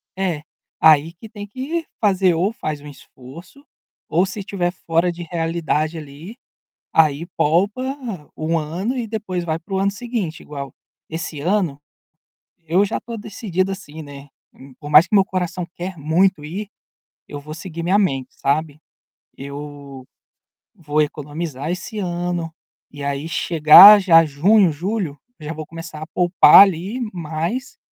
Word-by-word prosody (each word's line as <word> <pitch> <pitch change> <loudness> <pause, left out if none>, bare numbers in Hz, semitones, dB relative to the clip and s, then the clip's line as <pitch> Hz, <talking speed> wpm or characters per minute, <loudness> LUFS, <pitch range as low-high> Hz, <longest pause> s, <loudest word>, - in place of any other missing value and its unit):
É, 175 -6 -2 0.4
aí, 160 +1 +5
que 220 +6 -13
tem 205 -2 -8
que 290 +9 -4
fazer 190 -4 +3
ou 180 +6 0
faz 155 -8 -5
um 150 - -11
esforço 145 - -14 0.4
ou 175 +4 +2
se 195 +2 -7
estiver 185 -3 -2
fora 170 -1 0
de 175 0 -8
realidade, 165 -1 -2
ali, 155 - -10 0.6
aí, 155 0 +2
poupa 195 +10 +1 0.5
1 160 +1 -1
ano 175 - -3
e 240 -2 -3
depois 205 -5 -4
vai 160 -1 -2
para 180 +4 -8
o - - +1
ano 195 +1 +1
seguinte 210 -6 -4
igual, 140 -3 -8 0.4
esse 160 -2 -5
ano, 175 -4 0 0.9
eu 175 +5 +3
já 205 - -2
estou 235 -1 -8
decidido, 195 -3 -3
assim, 160 -5 -8
né, 145 -1 -11 0.3
hum, 135 0 -15
por 145 - -9
mais 150 +4 +7
que - - -10
meu 195 - +6
coração 180 -2 -3
quer 180 +1 -6
muito 160 +3 +1
ir, 190 +8 -6 0.6
eu 145 - -7
vou 150 +2 -9
seguir 165 0 -7
minha 185 +4 +2
mente, 135 -11 0
sabe, 150 +1 -1 0.6
eu 140 -1 -9 0.7
vou 150 -2 -2
economizar 150 0 -4
esse 190 +5 -5
ano 175 -2 -3 0.4
e, 145 0 -8
aí, 140 +2 -3
chegar 170 +6 +8
já 165 -4 +6
junho, 170 +6 +3
julho, 175 -1 -3 0.2
eu 150 - -11
já 160 - -4
vou 155 -1 -7
começar 165 -1 -9
a - - -5
poupar, 180 +2 +7
ali, 195 +6 -3
mas 170 - -4
170 Hz, 155 wpm, -20 LUFS, 150-195 Hz, 0.9 s, chegar